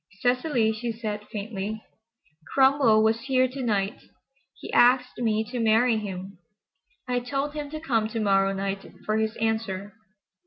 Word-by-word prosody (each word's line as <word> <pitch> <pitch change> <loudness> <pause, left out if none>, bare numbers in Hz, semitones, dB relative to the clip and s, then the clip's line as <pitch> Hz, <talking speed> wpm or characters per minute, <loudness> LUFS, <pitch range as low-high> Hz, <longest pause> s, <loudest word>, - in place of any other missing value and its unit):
"Cecily," 250 -2 +2
she 235 +2 -3
said 215 -2 -5
faintly, 210 0 -4 0.8
"Cromwell 265 -5 +5
was 225 +1 +2
here 255 -1 +3
to 265 +2 -7
night. 205 -4 -1 0.6
He - - -8
asked 250 +1 +4
me 220 -2 +1
to 250 - -3
marry 225 +1 +3
him. 190 -2 -6 0.7
I 250 0 +1
told 275 +4 -3
him 295 -1 -5
to 310 +1 -6
come 230 -9 0
to 225 +1 -4
morrow 195 -2 +3
night 195 0 -3 0.2
for 215 0 +1
his 220 0 -1
answer." 220 -3 -2
225 Hz, 150 wpm, -26 LUFS, 210-250 Hz, 0.8 s, Cromwell